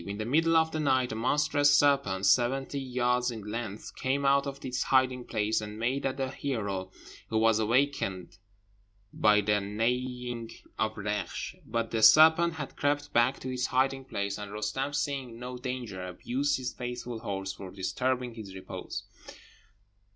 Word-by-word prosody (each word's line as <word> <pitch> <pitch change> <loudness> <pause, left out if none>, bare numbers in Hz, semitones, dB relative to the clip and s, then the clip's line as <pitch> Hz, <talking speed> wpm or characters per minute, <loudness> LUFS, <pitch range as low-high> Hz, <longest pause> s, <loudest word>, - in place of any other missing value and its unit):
In 100 +3 -5
the 110 - -3
middle 165 +6 +3
of 160 0 +3
the 155 - -2
night 130 -4 +2
a - - -3
monstrous 145 +4 +3
serpent, 135 -10 +2
seventy 130 +6 +2
yards 125 -1 0
in 110 -3 -6
length, 105 -1 -6
came 135 +2 -1
out 140 +1 +4
of 140 0 -7
its 125 0 -2
hiding 130 -2 +2
place, 110 +1 0
and 105 0 -7
made 130 +5 0
at 130 0 -3
the 135 -1 -2
hero, 100 -9 -3 0.4
who 110 - 0
was 110 0 +4
awaked 130 +6 +2 1.1
by 105 -1 +4
the 105 0 +2
neighing 120 +3 -2 0.3
of 110 0 0
Reksh; 105 -3 -3
but 115 0 -2
the 115 - 0
serpent 160 +8 +7
had 150 -4 -6
crept 145 0 -1
back 120 +3 +3
to 130 0 -4
its 125 0 -1
hiding 135 +1 +1
place, 100 -4 -3
and 105 -1 -7
Roostem, 105 +7 -2
seeing 135 -6 -2
no 125 +1 -6
danger, 120 -7 -5
abused 130 +10 -1
his 130 -1 -4
faithful 125 -1 -5
horse 95 -2 -4
for 95 -1 -9
disturbing 120 +7 -2
his 105 -4 -9
repose. 95 - -6
125 Hz, 165 wpm, -29 LUFS, 105-135 Hz, 1.1 s, serpent